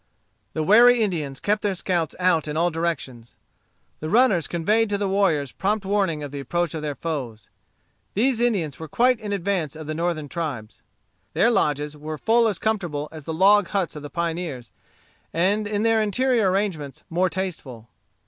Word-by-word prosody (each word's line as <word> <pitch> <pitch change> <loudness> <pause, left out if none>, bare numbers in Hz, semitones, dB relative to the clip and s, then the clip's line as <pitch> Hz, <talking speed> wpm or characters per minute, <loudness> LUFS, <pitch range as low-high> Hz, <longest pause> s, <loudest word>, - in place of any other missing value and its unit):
The 155 - -1
wary 235 +6 +6
Indians 155 -9 -3
kept 210 +1 0
their 200 -2 0
scouts 175 -4 -1
out 180 -4 +2
in 150 +1 -3
all 175 +2 +2
directions. 145 -8 -4 0.6
The 155 - -4
runners 210 - +3
conveyed 210 +6 +1
to 205 - 0
the 200 0 -1
warriors 170 -9 +1
prompt 205 +1 -1
warning 190 -6 0
of 145 - -6
the 145 - -5
approach 170 +4 -1
of 160 - -4
their 150 -2 -3
foes. 130 -11 -5 0.7
These 240 +3 +2
Indians 200 - 0
were 160 - -6
quite 245 - +2
in 210 -2 -5
advance 185 -6 -1
of 155 0 -8
the 155 - -3
northern 165 -2 -2
tribes. 140 -9 -5 0.5
Their 235 - +3
lodges 150 - 0
were 155 +1 -6
full 230 +6 +3
as 210 - -1
comfortable 175 -9 -2
as 155 -3 -10
the - - -4
log 200 +2 +5
huts 195 -4 -2
of 150 - -7
the 145 - -8
pioneers, 165 - -4 0.6
and 200 +5 +1
in 210 0 -1
their 225 -1 +3
interior 225 0 +2
arrangements 180 -8 -2
more 180 +3 +1
tasteful. 155 - -5
175 Hz, 175 wpm, -23 LUFS, 150-205 Hz, 0.7 s, wary